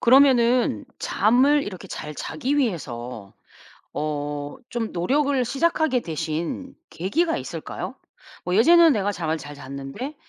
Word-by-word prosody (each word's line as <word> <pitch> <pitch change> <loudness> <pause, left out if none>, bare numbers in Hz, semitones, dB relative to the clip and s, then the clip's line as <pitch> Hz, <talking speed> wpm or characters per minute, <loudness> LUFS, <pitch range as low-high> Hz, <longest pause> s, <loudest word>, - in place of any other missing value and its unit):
그러면은 250 -1 +5
잠을 270 +6 +3
이렇게 190 -3 -7
잘 150 0 -6
자기 285 - -2
위해서 125 - -3 0.6
어 145 -1 -2 0.4
좀 235 -3 -3
노력을 270 +8 +1
시작하게 280 -1 +1
되신 165 - -4 0.2
계기가 320 - 0
있을까요? - - -6 0.5
뭐 180 +1 0
"예전에는 330 +6 +7
내가 205 -1 0
잠을 160 -3 -2
잘 145 -1 -9
잤는데 140 - -7
225 Hz, 270 characters per minute, -24 LUFS, -, 0.6 s, 예전에는